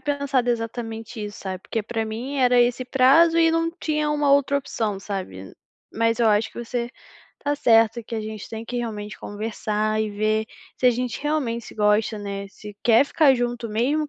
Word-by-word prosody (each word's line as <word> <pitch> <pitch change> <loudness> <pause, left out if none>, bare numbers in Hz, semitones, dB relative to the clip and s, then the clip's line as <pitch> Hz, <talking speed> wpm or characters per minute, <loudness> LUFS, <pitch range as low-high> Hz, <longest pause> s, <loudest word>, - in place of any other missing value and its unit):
pensado 280 -4 0
exatamente 225 -1 -4
isso, 205 0 -7
sabe, 190 -1 -5
porque 225 -2 -3
para 225 +1 -3
mim 240 +6 -5
era 250 -2 +4
esse 245 +1 +2
prazo 275 +7 +5
e 330 0 +5
não 330 0 +1
tinha 305 -3 -1
uma 295 -2 +2
outra 280 0 +3
opção, 225 -7 -2
sabe. 185 - -6 0.4
Mas 230 +1 +1
eu 230 -2 +4
acho 215 +1 +2
que - - -11
você 240 0 -3 0.5
tá 290 0 0
certa, 225 -3 +3
que 230 - -7
a 220 - -2
gente 215 -2 -7
tem 225 0 -6
que 245 +1 -4
realmente 210 -3 -5
conversar 215 0 -2
e 215 -1 -1
ver 215 +1 0 0.3
se 255 - +2
a - - +8
gente 245 +2 -3
realmente 265 -7 -1
se - - -11
gosta, 210 +1 +2
né, 200 -1 -5
se 210 +1 -11
quer 235 +3 +5
ficar 280 -2 +4
junto 240 -1 -2
mesmo, 255 +9 0
o 295 - -9
230 Hz, 195 wpm, -23 LUFS, 215-270 Hz, 0.5 s, a